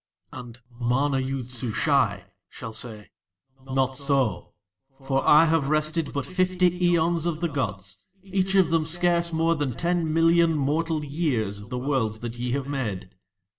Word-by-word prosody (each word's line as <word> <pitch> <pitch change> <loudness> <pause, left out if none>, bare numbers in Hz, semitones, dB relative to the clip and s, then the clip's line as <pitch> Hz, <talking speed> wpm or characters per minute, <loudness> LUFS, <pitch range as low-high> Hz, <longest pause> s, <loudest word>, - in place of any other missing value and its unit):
And 120 -1 -10 0.2
MANA 135 +3 +1
YOOD 130 -2 -4
SUSHAI 120 - +1 0.3
shall 115 - -8
say: 110 -2 -4 0.5
"Not 130 0 -1
so; 135 - -1 0.5
for 135 0 0
I 150 +2 +7
have 160 -4 +1
rested 155 +1 0
for - - -9
but 140 -2 -2
fifty 185 0 +1 0.2
aeons 170 -1 +1
of 160 -2 -2
the 170 - 0
gods, 105 - -4 0.2
each 190 0 -1
of 185 -4 +4
them 160 -1 +1
scarce 170 0 +1
more 165 +1 +2
than 145 -7 -3
ten 170 -2 0
million 165 0 +4
mortal 155 +2 -1
years 135 - -1
of 105 +2 -12
the 125 - -4
Worlds 125 -5 -1
that 120 0 -6
ye 125 0 -2
have 140 -1 -2
made." 105 -10 -4
140 Hz, 160 wpm, -25 LUFS, 125-165 Hz, 0.5 s, I